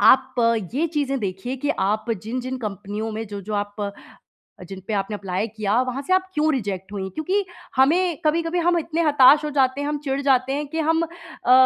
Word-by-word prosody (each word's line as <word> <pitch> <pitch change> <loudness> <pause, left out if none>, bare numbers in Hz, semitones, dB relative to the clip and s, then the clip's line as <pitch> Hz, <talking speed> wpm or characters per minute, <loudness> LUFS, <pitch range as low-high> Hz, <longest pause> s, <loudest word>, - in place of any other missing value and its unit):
आप 260 +5 +5 0.4
ये 320 +5 +2
चीज़ें 285 -4 -1
देखिए 200 +7 -3
कि 290 +3 -1
आप 215 +4 0
जिन-जिन 255 +3 -4
कंपनियों 210 0 -4
में 225 +1 -4
जो-जो 205 +1 -6
आप 205 0 -3 0.8
जिन 190 -1 -7
पे - - -1
आपने 200 +2 -1
अप्लाय 195 +1 -2
किया, 215 +2 0
वहाँ 255 +1 -3
से 370 - 0
आप 375 0 +5
क्यों 310 +1 +2
रिजेक्ट 195 -5 -4
हुईं? 190 -2 -3
क्योंकि 375 - -1 0.3
हमें 325 +5 +3
कभी-कभी 330 +3 +1
हम 345 0 +3
इतने 330 +1 -1
हताश 295 -1 +6
हो 300 - -2
जाते 270 -1 +2
हैं, 285 - -2
हम 295 0 -1
चिढ़ 275 0 -1
जाते 265 -1 +3
हैं 295 +1 -2
कि 320 +2 -2
हम 325 +1 +2
अ, 330 -6 -3
260 Hz, 195 wpm, -23 LUFS, 210-305 Hz, 0.8 s, हताश